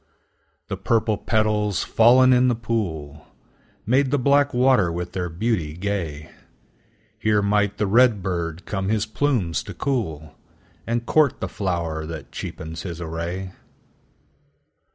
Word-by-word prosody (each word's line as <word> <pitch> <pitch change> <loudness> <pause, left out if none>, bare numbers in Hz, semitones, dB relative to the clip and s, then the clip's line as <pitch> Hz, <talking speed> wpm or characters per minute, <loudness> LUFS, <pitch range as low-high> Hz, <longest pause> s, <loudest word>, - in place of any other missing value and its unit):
The 95 - -4
purple 110 +3 +1
petals, 105 -2 0
fallen 130 +3 +5
in 125 0 +4
the 120 - +2
pool, 80 -11 -4 0.6
Made 130 +4 +2
the 145 - +2
black 140 +2 +3
water 125 -8 +3
with 90 +1 -4
their 90 -1 -3
beauty 85 -3 -1
gay; 85 -6 -4 0.9
Here 105 -1 +2
might 105 0 +1
the 105 - 0
red 110 -1 +4
bird 85 -2 -3
come 95 -1 -2
his 110 -1 +1
plumes 110 - 0
to - - -9
cool, 80 - -3 0.5
And 120 0 -1
court 150 -1 +3
the - - -3
flower 85 -5 -3
that 75 -5 -8
cheapens 80 +5 -6
his 85 -2 -6
array. 85 +3 -4
100 Hz, 130 wpm, -23 LUFS, 85-115 Hz, 0.9 s, fallen